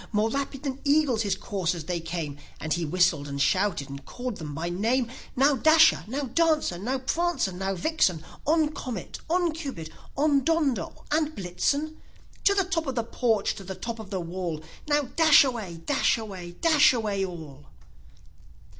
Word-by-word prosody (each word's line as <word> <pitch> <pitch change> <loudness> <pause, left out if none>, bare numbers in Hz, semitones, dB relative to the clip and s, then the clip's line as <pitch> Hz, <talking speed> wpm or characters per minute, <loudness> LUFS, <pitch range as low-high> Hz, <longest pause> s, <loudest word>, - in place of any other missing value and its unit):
More 215 +1 +1
rapid 275 0 -3
than 275 -1 -4
eagles 285 -5 +3
his 205 -3 0
coursers 180 -6 -2
they 175 +2 -2
came, 165 -4 -5 0.2
And 155 0 -1
he 170 -1 -1
whistled, 165 -3 +2
and 140 0 -5
shouted, 185 -2 +1
and 140 0 -8
called 245 -3 -5
them 150 -3 -6
by 165 +3 -3
name: 230 +7 0 0.3
ow, 275 +1 +5
Dasher! 315 +5 +5
now, 275 +6 -3
Dancer! 305 - +1
now, 250 +7 -1
Prancer 305 - 0
and 190 +1 -3
Vixen! 180 - +1 0.2
On, 315 0 +3
Comet! 250 - -6
on, 350 0 +2
Cupid! 275 - -6 0.3
on, 285 -1 +3
Donder 290 - +1 0.2
and 310 0 +1
Blitzen! 285 - -1 0.4
To 400 - +5
the 390 - +3
top 330 -3 -2
of 265 - -2
the 235 - 0
porch! 225 -3 0
to 195 - -9
the 190 0 -6
top 230 +2 -5
of 215 -3 -9
the 195 -2 -2
wall! 170 -2 -4 0.2
Now 295 0 +3
dash 315 +2 +6
away! 215 -11 -4
dash 285 -4 +2
away! 190 -6 -7
dash 305 - +5
away 210 -5 -1
all!" 155 -6 -8
225 Hz, 170 wpm, -26 LUFS, 175-290 Hz, 0.4 s, dash